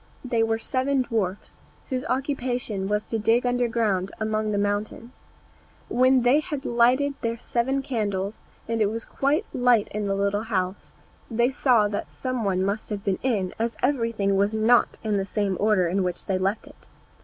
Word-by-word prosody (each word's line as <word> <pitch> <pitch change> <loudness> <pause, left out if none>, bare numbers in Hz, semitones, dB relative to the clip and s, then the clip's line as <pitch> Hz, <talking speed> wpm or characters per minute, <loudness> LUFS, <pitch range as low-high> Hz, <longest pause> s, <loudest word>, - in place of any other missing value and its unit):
They 235 -2 +1
were 225 0 +1
seven 260 +3 0
dwarfs, 205 -5 -3 0.3
whose 255 -1 -2
occupation 250 -7 -2
was 210 +1 0
to 225 - -3
dig 230 +3 +2
underground 230 -6 0
among 215 0 -1
the 205 - 0
mountains. 205 +4 -3 0.6
When 255 0 +4
they 250 +5 +5
had 295 -3 -5
lighted 250 +4 +3
their 230 0 -1
seven 265 +4 -1
candles, 205 -5 -2 0.3
and 230 -1 -1
it 210 - +4
was 225 +2 -4
quite 295 +9 0
light 245 -4 +3
in 210 -1 -3
the 195 - 0
little 200 +2 0
house, 185 -2 -2 0.3
they 240 +2 +2
saw 245 -5 +3
that 205 - -3
some 255 -3 -2
one 190 -2 +1
must 200 +3 -2
have 205 -2 -4
been 195 -2 0
in, 205 -8 0
as 230 +1 -1
everything 230 -7 +1
was 200 +2 +1
not 225 +3 +3
in 215 -2 0
the 195 - 0
same 200 0 -1
order 205 -4 +3
in 190 +3 0
which 180 -1 -3
they 190 -1 0
left 195 +3 -1
it. - - -17
225 Hz, 180 wpm, -25 LUFS, 200-245 Hz, 0.6 s, they